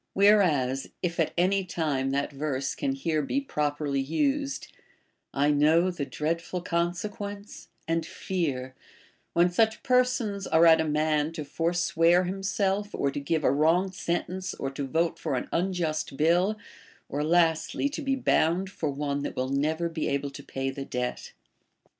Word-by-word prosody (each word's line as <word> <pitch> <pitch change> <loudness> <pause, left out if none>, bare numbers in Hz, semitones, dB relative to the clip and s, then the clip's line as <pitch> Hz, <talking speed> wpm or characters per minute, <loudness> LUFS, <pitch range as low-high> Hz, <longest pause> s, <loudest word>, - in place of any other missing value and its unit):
Whereas, 165 -11 +3 0.2
if 175 -1 -2
at 160 - +2
any 190 +3 +2
time, 150 -7 -1
that 140 +2 -1
verse 140 -2 -2
can 275 -1 -1
here 165 - 0
be 265 - -1
properly 145 - -1
used, 275 - -1 0.3
— - - -42 0.3
I 145 +2 +2
know 155 +3 +4
tlie 145 -6 -5
dreadful 165 +6 -2
consequence, 200 +4 -3 0.2
and 165 0 0
fear,* 145 -8 -3 0.6
Avhen 175 +1 +4
such 220 +3 +2
persons 250 -6 +1
are 160 +1 +5
at 160 -1 +7
a - - -1
man 150 0 +1
to 155 -3 -5
forswear 170 +2 +2
himself, 195 +2 -1
or 140 - 0
to 145 - -4
give 155 +2 -1
a - - +4
wrong 165 +7 +2
sentence, 185 +1 -3
or 135 - -4
to 135 0 -4
vote 165 +4 0
for - - -2
an - - -3
unjust 165 -6 -1
bill, 175 +7 +3 0.5
or 145 +1 -2
last 165 0 +2
ly - - -1
to 300 - -5
be 270 -2 0
bound 185 -6 +1
for 165 -6 -2
one 140 0 -2
that - - -4
will 130 +1 -1
never 155 +5 0
be 165 -2 -3
able 140 0 -1
to - - -9
pay 135 0 -3
the 135 +1 -6
debt'. 125 -2 -4
165 Hz, 165 wpm, -27 LUFS, 145-190 Hz, 0.6 s, at